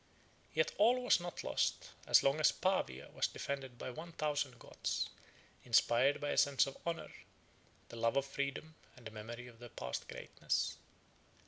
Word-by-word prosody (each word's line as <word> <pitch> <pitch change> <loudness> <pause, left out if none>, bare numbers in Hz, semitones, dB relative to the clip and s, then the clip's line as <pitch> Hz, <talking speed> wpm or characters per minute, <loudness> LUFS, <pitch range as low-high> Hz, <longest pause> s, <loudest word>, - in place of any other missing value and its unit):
Yet 480 0 +3
all 250 +2 +5
was 245 - +5
not 175 0 -5
lost, - - 0 0.2
as - - +7
long 140 +3 +3
as 155 - +6
Pavia 125 - -1
was - - +1
defended 135 -3 -5
by 130 - -5
one 165 +6 -8
thousand 145 -5 -1
Goths, - - -3 0.5
inspired 130 +5 +4
by 145 - -1
a - - +3
sense 140 -1 +4
of 135 - -6
honor, 170 0 -3 0.8
the 115 - -8
love 115 +2 +2
of 140 - +2
freedom, 140 +3 -3 0.2
and 120 - -15
the 110 - -6
memory 115 +3 -7
of 120 -2 -13
their 120 0 -9
past 65 - -5
greatness. - - -2
140 Hz, 165 wpm, -36 LUFS, 120-155 Hz, 0.8 s, as